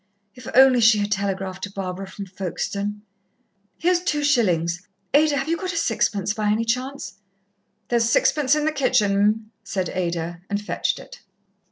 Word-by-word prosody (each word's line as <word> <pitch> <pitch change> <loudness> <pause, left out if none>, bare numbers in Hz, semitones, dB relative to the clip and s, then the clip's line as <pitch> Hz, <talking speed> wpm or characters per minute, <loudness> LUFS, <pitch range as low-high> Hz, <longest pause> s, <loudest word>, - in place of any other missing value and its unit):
If 250 - -12
only 260 -1 +7
she 225 -1 +6
had 205 0 -1
telegraphed 195 -2 -2
to 200 - -11
Barbara 195 -1 -5
from 195 +1 -8
Folkestone! 200 +2 -4 0.7
"Here's 355 +1 +2
two 300 -5 -1
shillings. 180 - +1 0.3
Ada, 295 0 +4
have 270 - -2
you 330 - +1
got 370 0 -4
a - - -3
sixpence, 210 - 0
by 215 -1 -1
any 220 +2 +1
chance?" 250 -5 -3 0.7
"There's 235 -1 +2
sixpence 285 +3 +3
in 300 0 0
the 310 - +2
kitchen, 255 -8 +2
'm," 215 +2 +1
said 185 -3 -2
Ada, 170 -1 -3
and 205 0 -1
fetched 210 - -2
it. - - -12
210 Hz, 165 wpm, -23 LUFS, 195-270 Hz, 0.7 s, only